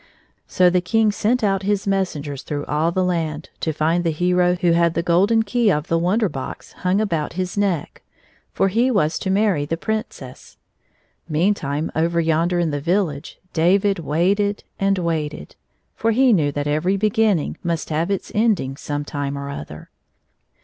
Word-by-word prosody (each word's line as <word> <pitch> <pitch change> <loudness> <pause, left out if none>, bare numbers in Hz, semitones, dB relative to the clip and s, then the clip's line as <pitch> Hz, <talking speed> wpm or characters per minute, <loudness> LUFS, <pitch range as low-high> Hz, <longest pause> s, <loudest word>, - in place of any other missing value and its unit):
So 180 -1 +3
the 180 0 +2
King 220 +4 +2
sent 230 +4 0
out 195 -2 +1
his 200 0 -1
messengers 155 -8 -2
through 145 -1 -4
all 155 +3 0
the 185 +2 0
land 160 -4 -2
to 160 - -1
find 160 +3 0
the 170 - +1
hero 180 +2 +2
who 175 -1 +1
had 170 0 +2
the 170 - 0
golden 195 +7 +3
key 235 +2 0
179 185 - +4
of 150 +3 -6
the 165 0 +1
Wonder 210 +5 +2
Box 135 -6 -7
hung 185 +2 0
about 165 -9 -1
his 185 +1 -3
neck. 195 -6 -1 0.5
For 195 - +1
he 235 +6 +2
was 160 -9 +1
to 190 - -3
marry 195 -5 +2
the 165 +3 -2
Princess. 190 - -5 0.7
Meantime 155 -3 0
over 170 +1 +1
yonder 165 +2 +1
in 170 -2 +1
the 145 -1 -3
village 170 -4 -1 0.2
David 195 +4 +2
waited 195 +7 0 0.2
and 195 0 +2
waited, 155 - -3 0.4
for 225 - 0
he 250 +2 +4
knew 150 -7 +2
that 145 0 -3
every 155 +7 +1
be 210 +1 +1
ginning 210 -7 +1
must 170 -2 -2
have 160 +4 0
its 195 -2 -3
ending 210 - +1
some 145 0 -4
time 140 -1 -4
or 140 0 -5
other. 75 - -9
175 Hz, 175 wpm, -21 LUFS, 155-200 Hz, 0.7 s, 179